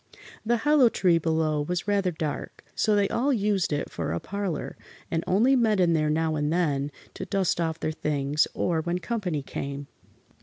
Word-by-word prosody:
The 235 +2 +2
hollow 285 0 +4
tree 175 -6 +3
below 160 -2 0
was 175 +5 -3
rather 200 -2 +2
dark, 155 -3 -5
so 215 -1 +2
they 200 -1 +3
all 270 +5 +1
used 205 -7 +1
it 145 0 -2
for 80 -1 -3
a 85 - -1
parlor, 200 - -4 0.4
and 165 0 0
only 235 +9 +4
met 220 -5 +2
in 175 -2 +4
there 155 -2 +1
now 160 +1 +1
and 150 0 0
then, 145 -5 0 0.2
to - - -6
dust 190 -4 0
off 160 -1 -1
their 155 - -1
things, 150 -1 0
or 165 -2 0
when 175 +2 -1
company 180 - -2
came. 140 +1 -5
170 Hz, 185 wpm, -26 LUFS, 150-205 Hz, 0.4 s, hollow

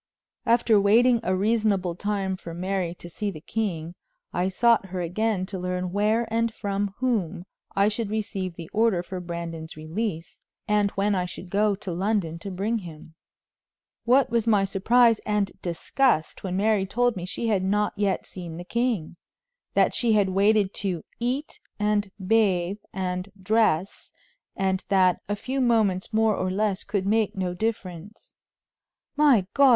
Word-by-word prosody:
After 230 -3 +4
waiting 235 +4 +5
a 190 -4 0
reasonable 200 -3 +1
time 195 0 -2
for 170 -3 -9
Mary 180 -1 -2
to 175 - -10
see 205 +4 -3
the 170 -6 -7
king, 170 -3 -3 0.4
I 180 +1 +1
sought 230 +1 +3
her 185 0 -5
again 185 +3 -1
to 190 -1 -6
learn 180 0 -2
where 215 +4 +2
and 230 0 +1
from 200 -2 -3
whom 195 -9 -1 0.3
I 200 +1 +4
should 215 0 -2
receive 200 -4 -3
the 165 -2 -8
order 215 -5 +2
for 185 +1 -6
Brandon's 170 -2 -6
release, 165 +2 -4 0.3
and 210 -1 +3
when 205 +1 +2
I 180 -2 0
should 180 0 -9
go 205 0 +2
to 190 -1 -6
London 180 -2 -1
to 195 - -6
bring 205 +5 -1
him. 160 -4 -11 0.9
What 255 +1 +4
was 230 -1 +1
my 205 -3 +4
surprise 230 +4 +4
and 210 -2 -1
disgust 175 - 0
when 185 -1 -2
Mary 205 -1 +2
told 245 +4 +1
me 180 - -5
she 230 +4 -2
had 200 -4 +2
not 205 +2 +1
yet 200 -2 0
seen 170 -3 -8
the 175 - -6
king 230 -7 -1 0.6
that - - +4
she 235 -3 +2
had 205 -2 +3
waited 200 +1 +3
to 180 -5 -2 0.2
"eat, 255 +5 -2 0.2
and 210 -1 +1 0.2
bathe, 195 -3 +2
and 185 0 -3
dress," 195 -3 +1 0.4
and 190 0 0
that 185 -3 +3
"a 205 - +1
few 260 +6 -3
moments 220 -6 +2
more 220 -1 +3
or 185 0 -1
less 200 0 0
could 200 -2 -2
make 215 +1 +1
no 185 -2 -2
difference." 195 -1 -5 0.8
"My 280 -10 +5
God! 280 -1 +6
200 Hz, 160 wpm, -25 LUFS, 180-220 Hz, 0.9 s, God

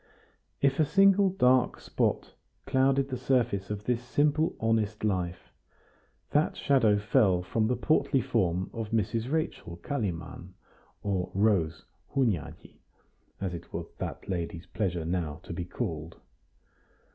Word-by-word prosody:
If 135 +1 +3
a - - +6
single 195 +4 +5
dark 130 -9 +3
spot - - -1 0.3
clouded 135 +1 +2
the 130 -2 -3
surface 120 -6 +1
of 105 0 -4
this 120 +1 0
simple 150 +5 +1
honest 110 -2 0
life, 90 -4 -2 0.8
that 150 +2 +2
shadow 115 -7 +3
fell 100 -3 +3
from 110 +4 0
the 125 - +1
portly 135 +1 +2
form 95 -8 0
of 115 -2 -4
Mrs. 115 +3 -1
Rachel 155 - -2
Kalimann, 90 -6 -4 0.5
or 95 -3 -1
Rose 95 -6 +1 0.3
Hunyadi, 115 - -1 0.6
as 95 -2 -3
it 85 - -8
was - - -5
that - - -5
lady's 85 -2 -3
pleasure 90 -6 -2
now 80 -3 -2
to - - -7
be 85 +1 -4
called. 85 -6 -5
110 Hz, 130 wpm, -29 LUFS, 90-130 Hz, 0.8 s, a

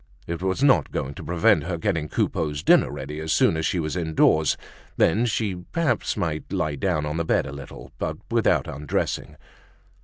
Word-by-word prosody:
It 85 0 -4
was 95 +7 0
not 130 - +4
going 70 +1 -3
to - - -9
prevent 80 -3 +3
her 85 -1 -2
getting 80 -1 -1
Coupeau's 75 -2 -1
dinner - - +5
ready 75 +3 -6
as 80 0 -3
soon - - +4
as 80 0 0
she 90 - 0
was 75 0 -2
indoors; 80 -2 +2 0.4
then 110 +8 +3
she 110 -3 0
might 90 0 -11
perhaps 155 -9 0
lie 75 -2 -2
down 75 -1 0
on 75 +1 -3
the 85 - 0
bed - - +1
a - - -6
little, 70 0 -10
but - - -2
without - - +2
undressing. 75 0 -3
80 Hz, 185 wpm, -24 LUFS, 75-90 Hz, 0.4 s, dinner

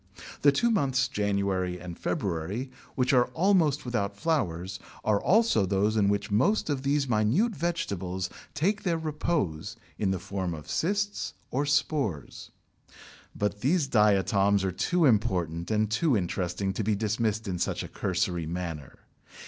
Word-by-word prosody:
The 145 - +6
two 235 +12 +2
months 135 - +2
January 100 -3 -1
and 90 -1 -7
February, 95 +9 -3 0.2
which 130 0 +2
are 125 -2 +5
almost 165 -6 +3
without 100 -5 -2
flowers, 95 - -1 0.3
are 105 -2 +2
also 220 - +3
those 100 +3 +1
in 100 -2 +3
which 100 +1 -1
most 155 - +2
of 135 -2 -1
these 140 0 +1
minute 125 - +2
vegetables 100 - -2 0.3
take 200 +7 +1
their 170 -3 0
repose 150 - -2 0.2
in 100 - +1
the 95 - 0
form 95 -1 -3
of 75 - -10
cysts 205 +4 -1 0.2
or 140 +3 0
spores. 140 - -1 0.9
But 105 0 -2
these 155 +4 +2
diatoms 100 -3 +3
are 95 - 0
too 170 - +1
important 90 - +1
and 110 0 +2
too 115 +4 +2
interesting 90 +1 -2
to 110 - -2
be 105 +1 +1
dismissed 110 +1 -1
in 90 -2 -2
such - - -1
a - - -6
cursory 90 -3 -1
manner. 85 -5 -5
105 Hz, 150 wpm, -28 LUFS, 95-145 Hz, 0.9 s, The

